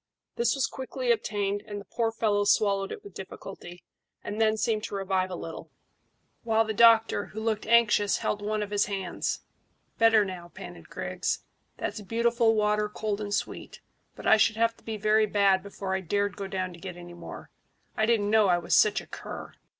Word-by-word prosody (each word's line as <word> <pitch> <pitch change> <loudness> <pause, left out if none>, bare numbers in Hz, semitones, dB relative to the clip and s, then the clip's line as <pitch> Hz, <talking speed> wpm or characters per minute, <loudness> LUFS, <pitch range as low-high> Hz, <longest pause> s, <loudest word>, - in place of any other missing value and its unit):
This 475 -8 +2
was 275 - +1
quickly 260 -1 -2
obtained, 205 -3 -1
and 205 -1 -5
the 200 - -11
poor 230 -2 -1
fellow 210 -2 +1
swallowed 200 -1 +2
it - - -7
with 200 - -12
difficulty, 185 -2 -9 0.4
and 210 +2 -3
then 220 0 +3
seemed 215 -1 0
to - - -5
revive 190 -1 0
a 180 - -4
little, 165 -1 -8 0.7
while 225 -1 +2
the 220 - -2
doctor, 225 -1 +5
who 215 - -8
looked 220 -1 -2
anxious, 215 -3 +4
held 210 - -2
one 210 0 -1
of 205 - -7
his 205 0 +2
hands. 195 -3 -3 0.6
"Better 225 -2 +5
now," 180 -2 -7
panted 175 -2 -10
Griggs. - - -3 0.3
"That's 215 - -4
beautiful 230 +2 +2
water, 210 0 +1
cold 210 0 -3
and 205 -1 -4
sweet; - - -3 0.4
but - - -10
I - - +6
should 220 0 +3
have 230 +1 +2
to - - -23
be 220 -1 -4
very 215 +1 +3
bad 200 -2 +3
before 200 -1 -5
I 190 - 0
dared 200 +3 -1
go 195 - -5
down 185 -2 -3
to 170 - -13
get 180 0 -7
any 175 0 -10
more. 175 - -10 0.4
I 220 - +1
didn't 210 -3 +2
know 215 -2 +5
I 175 -1 +4
was 175 - -2
such 210 -1 +4
a - - -13
cur." - - -8
210 Hz, 195 wpm, -28 LUFS, 195-220 Hz, 0.7 s, I